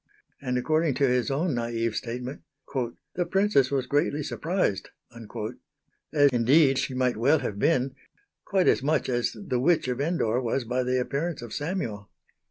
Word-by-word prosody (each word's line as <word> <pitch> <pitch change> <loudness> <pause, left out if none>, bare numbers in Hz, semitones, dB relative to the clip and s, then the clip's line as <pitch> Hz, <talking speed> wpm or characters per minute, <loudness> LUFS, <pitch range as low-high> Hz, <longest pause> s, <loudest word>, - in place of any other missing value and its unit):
and 125 -2 -1
according 155 +2 +1
to 140 - +3
his 125 -1 +1
own 155 +6 0
naïve 115 -1 -1
statement 125 +4 -5 0.7
"the 175 - 0
Princess 190 -8 +2
was 135 -2 0
greatly 145 +1 0
surprised," 165 - -1 1.2
as 145 -2 +5
indeed 135 +3 +4
she 130 - -2
might 125 -3 +1
well 140 +8 +4
have 100 -8 -4
been 135 -3 +2 0.5
quite 190 -3 +1
as - - +4
much 145 0 +1
as 120 -2 -1
the 120 +4 -2
witch 160 +2 +2
of 125 +1 -2
Endor 135 -7 0
was 125 +2 -1
by 125 +2 -1
the 125 0 +1
appearance 140 +2 -2
of 120 - -8
Samuel. 145 - -3
130 Hz, 160 wpm, -26 LUFS, 120-155 Hz, 1.2 s, as